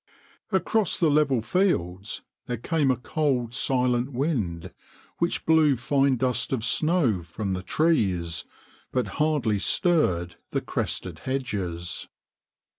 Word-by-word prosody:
Across 210 +1 +2
the 160 -4 +3
level 140 -6 +2
fields 105 - 0 0.2
there 125 - -2
came 145 +4 0
a 130 - +3
cold, 125 -4 -1
silent 125 0 +1
wind 105 - -2 0.5
which 170 +1 0
blew 160 -3 +5
fine 135 +2 +2
dust 125 -2 0
of 120 -4 0
snow 150 - +2
from 95 +4 -4
the 90 - -3
trees, 95 - +1 0.5
but 125 -2 0 0.2
hardly 140 -10 +1
stirred 90 - +2
the - - -1
crested - - -3
hedges. 95 -11 -3
125 Hz, 115 wpm, -26 LUFS, 95-150 Hz, 0.5 s, blew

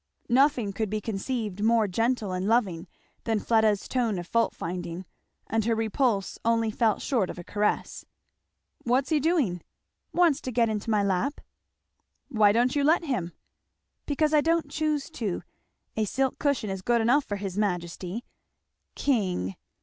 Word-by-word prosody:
Nothing 250 -5 +3
could 215 +1 -2
be 215 +1 -1
conceived 210 -1 -3
more 225 -1 +4
gentle 225 +1 0
and 185 +1 -2
loving 200 -7 +1 0.4
than 225 -2 +1
Fleda's 220 -2 +2
tone 235 -6 0
of 175 - -5
fault 230 +6 +1
finding, 175 +1 -5 0.4
and 225 0 0
her 230 0 +2
repulse 220 -2 0
only 230 -1 +2
fell 220 -1 +2
short 230 -10 0
of - - -6
a 175 - -7
caress. 210 +3 -1 0.8
"What's 255 +3 +1
he 310 -2 +3
doing?" 280 - +1 0.5
"Wants 335 -5 +3
to 255 - -4
get 230 -1 +2
into 215 +1 -3
my 210 -2 +2
lap." 200 +9 0 0.9
"Why 215 -3 +4
don't 245 +5 +2
you 285 - +2
let 320 +4 +4
him?" 215 - -2 0.7
"Because 300 +1 +1
I 300 - +6
don't 330 +1 +1
choose 305 -2 -1
to 220 - -3 0.5
a 220 - +1
silk 265 +5 -1
cushion 280 -8 0
is 190 -1 -4
good 235 +4 +2
enough 255 +6 +3
for 205 - -3
his 195 -2 -5
majesty. 180 +2 -2 0.7
King! 185 - 0
225 Hz, 155 wpm, -27 LUFS, 195-260 Hz, 0.9 s, I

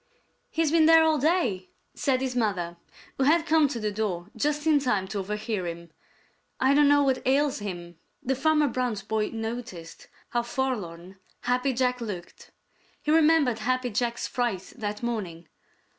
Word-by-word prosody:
"He's 320 -2 0
been 320 -1 +5
there 325 0 +7
all 315 -2 +2
day," 255 - 0 0.2
said 260 -2 0
his 260 -1 -2
mother, 185 -7 -1 0.4
who 265 - +2
had 325 +3 +4
come 315 -2 +4
to 255 -4 -4
the 215 -1 -2
door 200 -3 -3
just 295 +1 -1
in 310 -2 +4
time 210 -8 0
to 200 - -3
overhear 210 -1 -3
him. 170 0 -7 0.7
"I 265 +1 +4
don't 290 0 +5
know 285 0 +5
what 265 -2 +1
ails 275 +1 +2
him." 175 -4 -7 0.2
Then 265 +1 0
Farmer 300 +2 +3
Brown's 245 -5 -2
boy 215 +1 -1
noticed 225 -7 -6 0.2
how 240 - 0
forlorn 195 -8 -4 0.2
Happy 250 +2 +1
Jack 250 0 0
looked. 185 -7 -7 0.5
He 300 - 0
remembered 310 -7 +4
Happy 255 +2 -1
Jack's 235 +2 -1
fright 230 -7 -2
that 210 -2 -5
morning. 185 -9 -4
240 Hz, 160 wpm, -26 LUFS, 200-280 Hz, 0.7 s, there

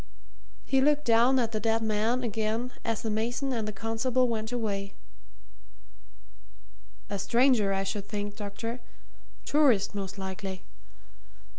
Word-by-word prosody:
He 270 -1 +3
looked 295 +1 +3
down 235 +3 +5
at 235 -3 +1
the 215 - -1
dead 225 0 +1
man 220 +3 +1
again 225 +2 -1
as 225 -2 -2
the 220 - -1
mason 240 +5 -1
and 225 -3 -2
the - - -2
constable 225 +4 0
went 220 -1 -2
away. 200 -5 -2 2.2
"A 200 - -2
stranger, 235 0 +3
I 195 0 0
should 200 0 -4
think, 205 -1 -4
doctor 225 +4 -5 0.7
tourist, 270 -11 +3
most 200 0 -5
likely. 190 0 -5
225 Hz, 130 wpm, -29 LUFS, 205-245 Hz, 2.2 s, down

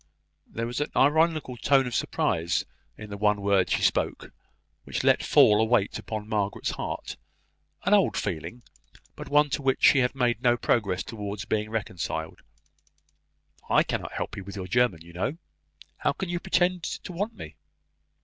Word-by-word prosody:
There 115 - -4
was 120 +4 -3
an 145 - -1
ironical 155 -2 +2
tone 135 +2 +3
of 125 - -5
surprise 85 -5 0 0.3
in 105 -1 -9
the 100 - -5
one 105 0 +2
word 100 -2 +2
she - - 0
spoke, - - 0 0.5
which - - -3
let - - +4
fall 105 +1 +5
a - - +4
weight 110 -3 +1
upon 110 -1 -6
Margaret's 105 -2 -1
heart; - - -5 0.7
an 200 - +2
old 200 -2 +3
feeling, 100 +6 -4 0.5
but - - -9
one 150 0 +3
to 140 - -1
which 135 -1 0
she 140 - +7
had 125 +1 +1
made 120 -3 +1
no 120 -2 +3
progress 100 -7 0
towards 105 -2 -6
being 105 0 -1
reconciled. 85 -7 -4 1.3
"I - - +5
cannot - - -4
help - - -4
you 100 - -6
with 100 +1 -9
your 95 -2 -5
German, 105 -4 +1
you 85 0 -14
know. 130 - -2 0.6
How - - 0
can 190 - -5
you 175 0 -1
pretend 180 0 +1
to 175 - -5
want 205 +6 -3
me?" 75 -1 -9
115 Hz, 170 wpm, -26 LUFS, 100-140 Hz, 1.3 s, she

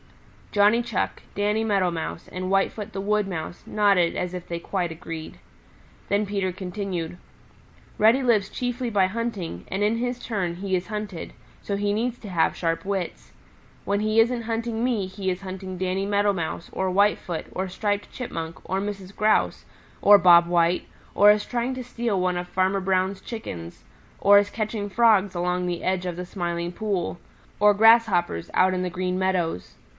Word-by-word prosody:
Johnny 210 +3 +4
Chuck, 235 -5 -2
Danny 210 +2 0
Meadow 195 -5 +2
Mouse 165 0 -5
and 185 0 -4
Whitefoot 195 +2 0
the 195 - -5
Wood 210 +1 +1
Mouse 175 -2 -6
nodded 200 -5 +2
as 180 0 -2
if 180 -1 -6
they 170 0 -4
quite 175 -1 -2
agreed. 160 -1 -7 0.7
Then 205 +1 +2
Peter 195 -2 -1
continued, 180 -2 -4 0.8
"Reddy 225 +5 +5
lives 215 -5 +2
chiefly 245 0 -3
by 200 -4 +3
hunting, 190 - -4
and 195 - -2
in 215 +2 +2
his 245 +1 -2
turn 190 -8 -2
he 190 +1 -2
is 180 0 -2
hunted, 210 -5 -5 0.3
so 200 - -2
he 205 0 0
needs 240 +3 -1
to 210 - -10
have 170 -3 +1
sharp 165 -1 -1
wits. 195 -3 -4 0.5
When 200 +1 0
he 215 +1 +2
isn't 235 +1 +3
hunting 230 0 -2
me 235 -6 +1
he 190 0 -4
is 180 0 -3
hunting 185 -1 -6
Danny 185 +1 -1
Meadow 205 0 +2
Mouse 170 -2 -4
or 190 0 -1
Whitefoot 185 -3 +1
or 190 0 -3
Striped 205 +2 -2
Chipmunk 165 -10 -5
or 190 +2 0
Mrs. 200 -1 -6
Grouse, 215 0 +1 0.4
or 205 0 +8
Bob 175 -2 +7
White, 170 0 +2 0.3
or 205 +1 +8
is 210 0 +1
trying 245 +2 -2
to 255 - -5
steal 235 -4 -2
one 180 0 +1
of 175 0 -3
Farmer 190 +2 +1
Brown's 190 0 0
Chickens, 85 - -7 0.3
or 200 0 +7
is 205 0 0
catching 215 -1 -3
Frogs 205 -3 +3
along 180 +1 0
the 175 -1 -3
edge 185 -1 0
of 175 -1 -4
the 180 - -4
Smiling 175 -2 -3
Pool, 190 -4 -2 0.4
or 210 0 +7
grasshoppers 210 - +4
out 185 0 +4
in 180 - -1
the 180 - -1
Green 180 +1 -2
Meadows. 180 - -1
195 Hz, 175 wpm, -25 LUFS, 180-210 Hz, 0.8 s, or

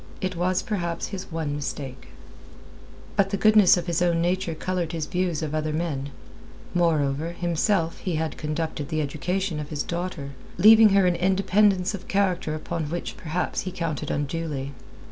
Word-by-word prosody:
It 185 -1 -2
was 180 +2 +1
perhaps 170 -6 -2
his 190 -3 -7
one 160 -3 -2
mistake. 140 -2 -5 1.1
But 195 -1 +3
the 200 - -1
goodness 215 -3 +6
of 175 - -2
his 170 -1 0
own 170 -1 +2
nature 175 0 0
coloured 175 0 -2
his 160 -2 -2
views 175 -3 -1
of 155 -1 -3
other 155 0 -1
men; 150 -4 -2 0.6
moreover, 160 -2 +1
himself, 175 0 0
he 180 -4 -2
had 160 0 -2
conducted 155 -1 -3
the 155 - -1
education 165 +4 -2
of 150 -1 -6
his 150 -2 -2
daughter, 170 -5 -4 0.3
giving 220 +1 +8
her 195 -1 +4
an 180 -1 +3
independence 190 +1 +2
of 200 - -7
character 185 -5 0
upon 160 +1 -3
which 175 +2 -4
perhaps 165 +2 -2
he 185 - -5
counted 165 -5 -3
unduly. 145 -2 -2
170 Hz, 165 wpm, -25 LUFS, 155-185 Hz, 1.1 s, giving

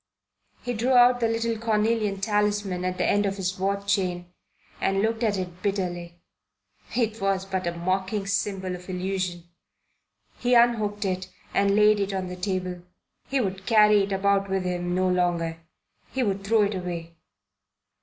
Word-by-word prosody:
He 245 - -2
drew 240 +3 +1
out 245 0 +6
the 230 - +2
little 225 0 -1
cornelian 215 -2 +1
talisman 205 -3 0
at 185 0 -2
the - - +1
end 205 0 +2
of 195 0 -3
his 185 -1 -2
watch 200 +1 +1
chain 175 -2 -4 0.5
and 195 0 +1
looked 225 +1 0
at 215 -4 +1
it 180 -1 -6
bitterly. 175 -4 -2 0.8
It 225 -2 0
was 195 -1 0
but 190 -2 -2
a 170 0 -3
mocking 190 +3 -1
symbol 195 -2 -1
of 180 +1 -12
illusion. 185 -1 -2 1.0
He 245 0 +2
unhooked 215 -4 +3
it 185 -1 -2 0.2
and 200 0 +3
laid 210 0 +5
it 200 0 -1
on 185 -1 -3
the 180 - -5
table. 180 -1 -3 0.5
He 275 - 0
would 190 -4 -3
carry 210 -2 +6
it 195 +1 -2
about 195 0 +1
with 190 -1 0
him 175 -1 -2
no 185 0 +2
longer. 175 -2 0 0.5
He 265 - 0
would 195 -3 -1
throw 215 +1 +3
it 205 +1 0
away. 170 -3 -5
195 Hz, 165 wpm, -26 LUFS, 185-210 Hz, 1.0 s, out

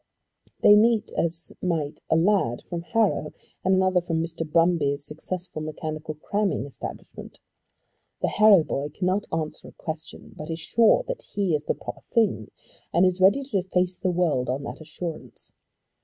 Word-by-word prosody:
They 205 - +9
meet 220 0 +3
as 170 0 -1
might 160 -5 -1
a 160 - +4
lad 165 - +2
from 175 -2 -5
Harrow 200 -4 0 0.3
and 190 0 +3
another 185 -1 +3
from 165 -2 -2
Mr. 165 -1 -3
Brumby's 155 -4 +2
successful 160 +2 -4
mechanical 155 0 -5
cramming 200 +1 -1
establishment. 140 - -9 0.9
The - - +3
Harrow 210 -5 +6
boy 145 -1 -3
cannot 185 +6 -1
answer 160 -1 -3
a - - -13
question, 160 0 -7
but 155 - -8
is 165 - -2
sure 225 - +3
that - - -4
he 195 -5 +1
is 150 0 -1
the - - 0
proper - - -8
thing, 210 - 0 0.4
and 175 +3 +4
is 185 0 +1
ready 200 +9 +5
to 215 -8 -1
face 180 0 -1
the 185 - 0
world 165 -8 +1
on 135 +2 -2
that 140 - -7
assurance. 160 +1 -7
170 Hz, 160 wpm, -25 LUFS, 155-190 Hz, 0.9 s, They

